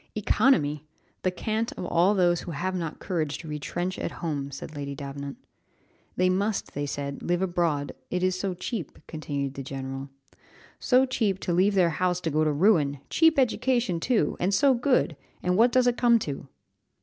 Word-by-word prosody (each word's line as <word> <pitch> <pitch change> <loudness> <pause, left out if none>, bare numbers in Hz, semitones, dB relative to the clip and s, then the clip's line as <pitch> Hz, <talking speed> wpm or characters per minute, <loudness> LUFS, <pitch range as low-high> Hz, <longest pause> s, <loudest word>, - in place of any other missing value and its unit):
"Economy! 185 - +2 0.4
The 185 - +1
cant 220 +5 -2
of - - -6
all 175 +4 +3
those 175 -2 +3
who - - -6
have 185 +6 -2
not 170 -4 -3
courage 160 -6 -2
to 165 - -10
retrench 175 +5 -3
at - - -3
home," 145 -5 -3
said 140 +3 -8
Lady 140 -1 -5
Davenant. 140 0 -6 0.8
"They 185 - +3
must," 195 +3 0
they 145 0 -3
said, 140 0 -4
"live 175 +1 0
abroad, 170 -6 0 0.2
it 180 0 -1
is 185 0 +2
so 190 -2 -2
cheap," 185 - -5
continued 140 -3 -4
the 140 - -6
general. 135 0 -6 0.7
"So 255 +1 +4
cheap 220 -7 0
to 175 - -1
leave 195 +4 +3
their 175 -3 +4
house 180 +2 0
to 165 - -2
go 155 +2 +2
to 155 - +2
ruin! 150 -3 +3
Cheap 325 -1 +4
education 245 -6 +1
too! 240 +5 +1
and 190 +3 +1
so 275 +6 +5
good 245 - +1 0.3
and 180 0 +1
what 235 +5 +5
does 255 -1 +4
it 245 -1 +2
come 240 -1 +5
to?" 140 -10 -5
175 Hz, 185 wpm, -27 LUFS, 145-210 Hz, 0.8 s, so